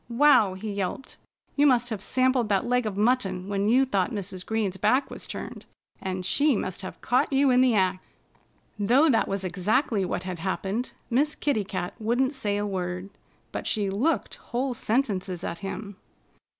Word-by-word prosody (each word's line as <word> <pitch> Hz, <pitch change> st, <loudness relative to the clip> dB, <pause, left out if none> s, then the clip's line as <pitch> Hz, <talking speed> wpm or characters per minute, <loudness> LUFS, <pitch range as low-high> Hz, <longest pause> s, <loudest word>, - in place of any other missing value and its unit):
"Wow!" 235 Hz, -6 st, +5 dB
he 210 Hz, +3 st, -5 dB
yelped. 200 Hz, +6 st, -4 dB, 0.4 s
"You 290 Hz, 0 st, +5 dB
must 245 Hz, -2 st, +3 dB
have 210 Hz, -3 st, -3 dB
sampled 255 Hz, -1 st, +2 dB
that 195 Hz, 0 st, +2 dB
leg 250 Hz, -1 st, +1 dB
of 200 Hz, -2 st, -4 dB
mutton 205 Hz, -5 st, +1 dB
when 200 Hz, +1 st, 0 dB
you 260 Hz, +4 st, +5 dB
thought 195 Hz, -7 st, 0 dB
Mrs. 190 Hz, -3 st, -5 dB
Green's 215 Hz, -4 st, -1 dB
back 260 Hz, +8 st, +2 dB
was -, -, -6 dB
turned. -, -, -7 dB, 0.3 s
And 185 Hz, -1 st, -3 dB
she 290 Hz, +4 st, +3 dB
must 190 Hz, -1 st, -3 dB
have 185 Hz, -, -8 dB
caught 250 Hz, +3 st, +1 dB
you 270 Hz, 0 st, +4 dB
in 250 Hz, 0 st, +5 dB
the 255 Hz, -3 st, +4 dB
act." 185 Hz, -2 st, +1 dB, 0.8 s
Though 255 Hz, +9 st, +4 dB
that 225 Hz, -, +2 dB
was 195 Hz, -1 st, -2 dB
exactly 200 Hz, -, +1 dB
what 180 Hz, 0 st, -2 dB
had 185 Hz, -2 st, -5 dB
happened, 195 Hz, +6 st, -2 dB, 0.2 s
Miss 290 Hz, +5 st, +2 dB
Kitty 275 Hz, -8 st, 0 dB
Cat 185 Hz, -2 st, -4 dB
wouldn't 245 Hz, +5 st, +1 dB
say 210 Hz, -7 st, -1 dB
a 205 Hz, -, -1 dB
word. 185 Hz, -1 st, -4 dB, 0.4 s
But -, -, -4 dB
she 205 Hz, -3 st, 0 dB
looked 260 Hz, +12 st, 0 dB
whole 255 Hz, +2 st, -3 dB
sentences 200 Hz, -7 st, -1 dB
at 170 Hz, -, -4 dB
him. 200 Hz, 0 st, -6 dB
210 Hz, 175 wpm, -26 LUFS, 190-255 Hz, 0.8 s, Wow